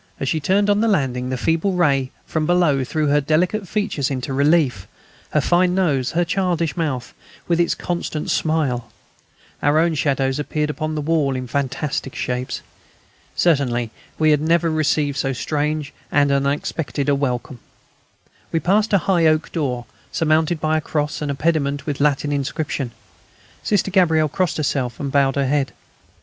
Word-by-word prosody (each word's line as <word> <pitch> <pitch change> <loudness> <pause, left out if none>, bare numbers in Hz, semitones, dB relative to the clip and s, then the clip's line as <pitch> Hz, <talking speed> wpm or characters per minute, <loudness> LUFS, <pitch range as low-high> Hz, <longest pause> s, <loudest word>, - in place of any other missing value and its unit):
As 135 - -2
she 160 - +1
turned 195 +6 +2
on 205 0 +3
the 230 - +2
landing, 130 - 0
the 130 - -2
feeble 165 +8 +1
ray 140 -7 +2 0.2
from 155 -1 -1
below 170 -7 +3
threw 155 +4 -1
her 145 +1 +3
delicate 180 +8 +1
features 205 - -1
into 135 -1 -3
relief: 140 - +2 0.4
her - - +2
fine 180 +1 +2
nose, 145 -9 +1
her 175 +1 +2
childish 170 -3 0
mouth, 140 -7 -2 0.3
with 170 -1 +1
its 170 - +2
constant 170 -3 -3
smile; 150 -7 0 0.7
our 145 +2 +3
own 165 +1 +3
shadows 135 -2 0
appeared 150 0 -1
upon 155 0 -3
the 150 - -1
wall 150 -3 +1
in 130 0 -3
fantastic 135 +1 -2
shapes. 125 0 -3 0.7
Certainly 125 -8 +1 0.3
we 155 -1 +4
had 150 -1 +3
never 165 +1 +2
yet 155 - -1
received 145 -2 +1
so 135 -1 0
strange 150 +2 -2 0.2
and 145 -1 +3
unexpected 140 0 -1
a 145 - +4
welcome. 130 -2 -2 0.9
We 165 - +1
passed 205 +6 +2
a - - +7
high 175 -4 +3
oak 155 0 +1
door, 125 -7 -2 0.3
surmounted 160 +1 +1
by 155 0 +1
a - - -1
cross 150 -1 -2
and 150 - -2
a 140 - -1
pediment 145 -2 0
with 145 -3 -3
a - - +4
Latin 145 0 +1
inscription. 140 -1 -2 0.7
Sister 200 -2 0
Gabrielle 160 -5 +3
crossed 180 +3 -1
herself 135 -5 -1
and 140 -1 -3
bowed 135 -1 +3
her 140 -1 +1
head. 140 0 0
150 Hz, 170 wpm, -21 LUFS, 135-165 Hz, 0.9 s, a